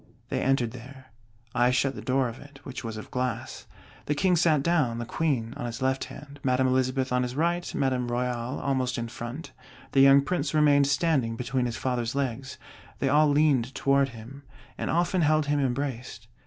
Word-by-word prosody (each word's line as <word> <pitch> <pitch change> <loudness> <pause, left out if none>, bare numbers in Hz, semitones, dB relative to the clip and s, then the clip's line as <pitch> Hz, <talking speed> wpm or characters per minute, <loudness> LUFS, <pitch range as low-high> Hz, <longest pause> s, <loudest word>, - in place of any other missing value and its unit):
They - - -1
entered 130 -4 +1
there; 130 +2 -12 0.4
I 120 0 +3
shut 130 +2 +1
the - - -8
door 130 0 +1
of 115 +1 -8
it, 145 -1 -14
which 130 -1 -7
was 110 -2 -5
of 110 - -9
glass. 125 0 -3 0.4
The 150 - +1
King 180 +4 +2
sat 155 -4 +3
down, 150 -9 +1
the 120 - -4
Queen 125 -5 -1
on - - -4
his 120 0 -6
left 130 0 0
hand, 145 -1 -11
Madame 130 0 +2
Elizabeth 130 0 +1
on 125 - +2
his 125 0 -3
right, 170 +3 0
Madame 130 -2 0
Royale 120 +1 -2
almost 130 -2 -1
in 115 -1 -3
front; 120 +7 -7 0.4
the 135 - +4
young 135 +1 +7
Prince 155 0 -2
remained 145 -2 +5
standing 140 -5 +1
between 125 +1 -1
his 115 - -4
Father's 125 -1 -2
legs. 130 -1 -3 0.4
They 135 - 0
all 150 +2 +5
leaned 140 -4 +2
toward 140 0 +2
him, 120 +4 -11 0.3
and - - -4
often 175 +2 +1
held 155 -1 +3
him 145 0 +1
embraced. 125 -4 -3
130 Hz, 190 wpm, -27 LUFS, 125-145 Hz, 0.4 s, young